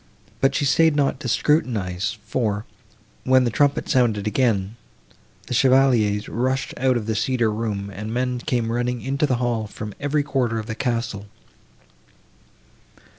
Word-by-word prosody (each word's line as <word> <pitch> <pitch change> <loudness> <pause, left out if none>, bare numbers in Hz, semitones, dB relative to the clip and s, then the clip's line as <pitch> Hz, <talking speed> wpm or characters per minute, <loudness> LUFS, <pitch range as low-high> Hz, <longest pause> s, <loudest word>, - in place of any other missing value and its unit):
But 135 0 +2
she 145 - +1
staid 155 +3 +4
not 140 -2 +1
to - - -5
scrutinize, 105 - 0
for, 110 -2 -1 0.6
when 130 0 +4
the 120 - 0
trumpet 145 +4 +1
sounded 110 -5 +2
again, 105 -3 0 0.7
the 125 - -5
chevaliers 120 -6 +3
rushed 130 +3 -1
out 130 -1 +2
of 110 - -4
the 110 - -1
cedar 115 +1 +1
room, 105 -2 -3
and 105 +3 -6
men 125 +1 -1
came 120 -4 -1
running 120 0 -2
into 140 +3 0
the 130 - +1
hall 120 -3 -1
from 105 0 -7
every 145 +1 0
quarter 130 -5 -1
of 110 - -4
the 110 - -4
castle. 115 -4 -3
120 Hz, 150 wpm, -22 LUFS, 110-130 Hz, 0.7 s, staid